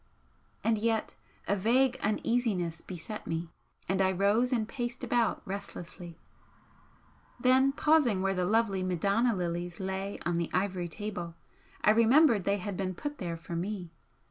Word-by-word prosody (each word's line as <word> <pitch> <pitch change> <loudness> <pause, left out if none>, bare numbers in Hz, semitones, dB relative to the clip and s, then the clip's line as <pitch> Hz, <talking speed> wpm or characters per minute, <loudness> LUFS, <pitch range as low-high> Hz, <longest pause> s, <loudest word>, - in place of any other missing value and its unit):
And 225 -1 +2
yet 225 0 0 0.3
a 200 - +2
vague 250 +6 +2
uneasiness 210 -6 0
beset 185 +4 -7
me, 165 +1 -3 0.4
and 190 0 +1
I 190 0 +3
rose 205 +7 +2
and 225 -4 +1
paced 240 0 -4
about 235 -2 +1
restlessly, 180 -3 -7 1.2
then 260 +2 +4
pausing 275 -10 +3
where 195 0 +1
the 180 -1 0
lovely 210 -1 +2
Madonna 200 +6 +1
lilies 175 -1 -3
lay 190 +1 -3
on 175 -1 0
the 170 - -2
ivory 185 -2 0
table, 175 -2 -5 0.5
I - - +6
remembered 230 - +5
they 200 0 +2
had 200 0 -4
been 185 -1 -2
put 290 +9 -5
there 170 -3 -3
for 165 +1 -7
me. 180 -1 -4
200 Hz, 145 wpm, -30 LUFS, 180-230 Hz, 1.2 s, I